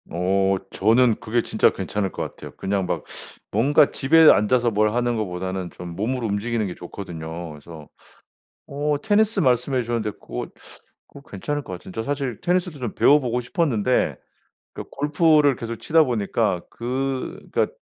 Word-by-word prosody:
어 95 +3 +1
저는 115 +3 +3
그게 115 +1 0
진짜 - - +3
괜찮을 100 -3 -3
것 - - -4
같아요. - - -9
그냥 95 -1 -1
막 - - -2 0.5
뭔가 140 +7 +4
집에 160 +3 +5
앉아서 120 +3 +2
뭘 105 0 +2
하는 120 0 0
것보다는 95 -3 -3
좀 85 -1 -9
몸을 120 +6 -2
움직이는 110 +1 -1
게 90 - -4
좋거든요. 85 -2 -7
그래서 75 0 -12 0.8
어 145 +1 -1
테니스 215 -1 +2
말씀해 130 -1 +2
주셨는데 115 -2 -2
고거 - - -5 0.6
고거 140 0 -15
괜찮을 145 +9 -3
것 95 - -8
같은데. 90 +1 -10
저 115 - -2
사실 135 -4 -3
테니스도 180 -3 0
좀 120 -4 -4
배워보고 125 -4 +3
싶었는데 125 - 0 0.6
그 - - -6
골프를 150 -1 +3
계속 115 -1 -6
치다 160 +8 +3
보니까 110 - 0
그 130 +2 -3
그니까 - - +1
115 Hz, 335 characters per minute, -23 LUFS, 100-140 Hz, 0.8 s, 집에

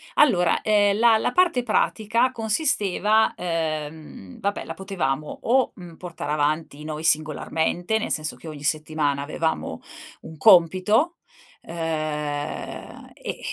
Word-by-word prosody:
Allora, 180 - +4
ehm, 205 -1 +3
la 230 -1 +6
la 230 - -1
parte 345 -8 +2
pratica 235 +1 +1
consisteva 220 - +1
ehm, 155 - -4
vabbè, 200 0 -2
la - - -6
potevamo 155 -7 -3
o, 255 +2 +2
mhmm, 175 -4 -11
portare 170 -4 -6
avanti 150 0 -1
noi 155 0 -5
singolarmente, 160 +5 0
nel - - -3
senso 155 -1 -2
che 165 - -13
ogni 150 -2 -8
settimana 150 -2 0
avevamo 160 - -3 0.4
un 160 - -11
compito, 210 - +4 0.4
ehm, 155 -3 -4
e - - -9
e - - -12
170 Hz, 125 wpm, -24 LUFS, 155-215 Hz, 0.4 s, la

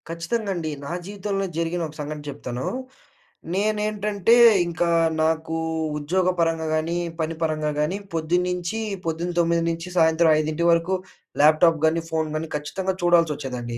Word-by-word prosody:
ఖచ్చితంగండి. 170 -1 -2
నా 140 - -5
జీవితంలో 195 0 -3
జరిగిన 170 +1 -1
ఒక 155 - -13
సంఘటన 150 0 -5
చెప్తాను. 130 -3 -5 0.9
నేనేంటంటే 210 +1 +1 0.3
ఇంకా 170 0 -1 0.3
నాకు 160 0 0 0.4
ఉద్యోగపరంగా 165 0 0
గానీ, 165 +2 -1 0.2
పని 160 +1 -2
పరంగా 155 -1 0
కానీ 150 +6 0 0.2
పొద్దున్నుంచి 180 +4 -1 0.3
పొద్దున 165 +2 -2
9 170 0 +2
నుంచి 165 +1 -4
సాయంత్రం 160 0 +4
5 155 +2 -1
వరకు 170 +3 +2 0.5
ల్యాప్ 155 +1 +6
టాప్ 165 -2 +5
గానీ, 165 +1 +2
ఫోన్ 160 -1 -1
గానీ 155 +1 -3
ఖచ్చితంగా 185 +6 -2
చూడాలచొచ్చేదండి. 145 -9 +1
165 Hz, 125 wpm, -23 LUFS, 155-180 Hz, 0.9 s, ల్యాప్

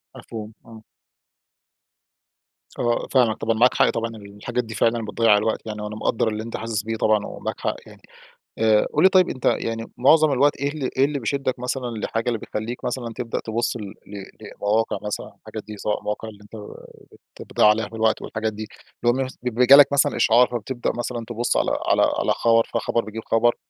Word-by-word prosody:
مفهوم. 110 -1 -8
آه. 115 -1 -13 2.0
آه، 120 -1 0
فاهمك 120 -5 +3
طبعًا، 115 0 0
معاك 125 +2 +5
حق - - +3
طبعًا 115 0 -2
الحاجات 105 +4 -5
دي 110 -1 -8
فعلًا 115 +2 +1
بتضيّع 110 -1 +3
الوقت 110 +1 -1
يعني 105 -1 -5
وأنا 105 0 -5
مقدّر 110 +1 0
اللي 110 0 -2
أنت 115 - -5
حاسس 110 -1 -3
بيه 115 +1 -3
طبعًا 110 -1 +2
و - - -8
معاك - - -5
حق - - -1
يعني. - - -15 0.6
آآ، 110 -1 +3
قُل 150 - +2
لي 190 - +8
طيب 185 -1 +4
أنت 130 - -6
يعني 115 0 0
مُعظم 155 +4 +5
الوقت 140 +2 +3
إيه 140 - +1
ال 140 -4 -5
إيه 135 - +5
اللي 145 -1 -2
بيشدّك 130 +1 -2
مثلًا 125 0 -3
لحاجة، 115 +2 -3
اللي 120 -2 +1
بتخلّيك 110 +4 -5
مثلًا 120 -1 -3
تبدأ 120 -2 -3
تبُص 115 +2 -1
ل - - -8
ل 100 0 -9 0.2
لمواقع 105 +1 -1
مثلًا 105 -1 -4
الحاجات 110 - -8
دي 105 0 -9
سواء 105 +1 -2
المواقع 105 +1 -4
اللي 105 -1 -15
أنت 105 - -20 0.8
ت - - -10
بتضيّع - - +2
عليها 105 0 +3
في 115 - -14
الوقت 110 0 +1
والحاجات 110 0 -3
دي؟ 110 +1 -7 0.4
اللي 120 - +4
هو - - +1
مس 130 - -9
بي 125 0 +1
جالك 140 +1 +8
مثلًا 140 0 +2
إشعار، 120 +2 +5
فبتبدأ 120 +1 -3
مثلًا 120 -1 -4
تبُص 120 0 -1
على - - +1 0.2
على - - +3 0.2
على - - +2
خبر، 115 -1 +3
فخبر 115 +1 0
بيجيب 110 +1 -7
خبر؟ 120 +1 +2
115 Hz, 200 wpm, -23 LUFS, 110-125 Hz, 2.0 s, لي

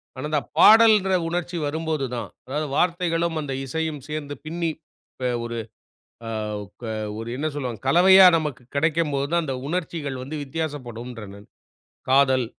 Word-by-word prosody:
ஆனா, 130 - -5
இந்தப் 150 -2 -1
பாடல்ன்ற 215 -4 +7
உணர்ச்சி 175 0 -3
வரும்போது 155 -1 -2
தான். 115 -4 -5 0.2
அதாவது, 150 +3 -3
வார்த்தைகளும் 170 -2 +1
அந்த 135 -2 -4
இசையும் 155 +1 -3
சேர்ந்து 150 -1 -5
பின்னிப் 165 -1 -3 0.4
ப 125 - 0 0.2
ஒரு 120 0 -4 0.7
அ - - -5 0.5
ப - - -24 0.4
ஒரு 115 +1 -6
என்ன 155 +3 -2
சொல்லுவாங்க 125 -6 -4
கலவையா 185 +4 +8
நமக்குக் 145 -6 -4
கெடைக்கும் 155 0 +1
போது 140 0 0
தான் 170 0 +2
அந்த 135 -3 -3
உணர்ச்சிகள் 160 -5 -3
வந்து 150 +4 -6
வித்தியாசப்படும்றேன் 125 -8 -6
நான். 100 +1 -14 0.6
காதல், 130 -2 +4
150 Hz, 145 wpm, -24 LUFS, 130-165 Hz, 0.7 s, கலவையா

